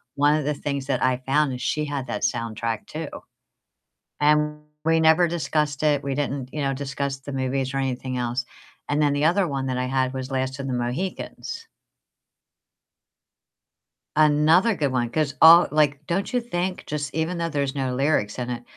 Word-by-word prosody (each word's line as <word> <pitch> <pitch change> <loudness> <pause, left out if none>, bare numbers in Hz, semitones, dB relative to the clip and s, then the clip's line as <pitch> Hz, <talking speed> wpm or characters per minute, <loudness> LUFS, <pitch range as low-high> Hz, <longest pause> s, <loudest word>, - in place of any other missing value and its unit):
one 145 +2 +4
of 155 - 0
the 150 - +1
things 140 -1 -4
that 140 - 0
I 130 -1 +2
found 140 0 +2
is 125 - -6
she 150 0 -1
had 140 -3 -4
that - - -4
soundtrack 115 -1 -2
too, 155 -1 -5 1.1
and 150 0 +2 0.2
we 165 0 +3
never 160 +2 +5
discussed 150 -2 -1
it, 145 -2 +3
we 140 -1 -2
didn't, 135 -2 -3
you 150 - -4
know, 135 -1 0
discuss 140 0 -3
the 135 +1 -8
movies 130 0 -1
or - - 0
anything 130 -1 -2
else. 120 +1 -1 0.4
And 145 +1 +1
then 145 -1 +3
the 145 +1 0
other 180 +2 +3
one 135 -3 -3
that 130 -1 -2
I 125 - 0
had 130 0 0
was 130 0 -5
Last 130 +1 -2
of 135 - -4
the 130 - -2
Mohicans. 140 - -4 2.5
Another 155 +8 +4
good 140 -5 0
one, 120 -2 0
'cause 150 0 -1
all 165 +2 +9
like, 150 -1 +1
don't 195 +8 -1
you 245 - +2
think 185 -5 -3
just 145 -1 -3
even 160 +3 -1
though 170 0 -1
there's 140 -2 -2
no 130 -2 -1
lyrics 130 -6 0
in 125 0 -3
it, 120 0 -4
140 Hz, 185 wpm, -24 LUFS, 130-155 Hz, 2.5 s, all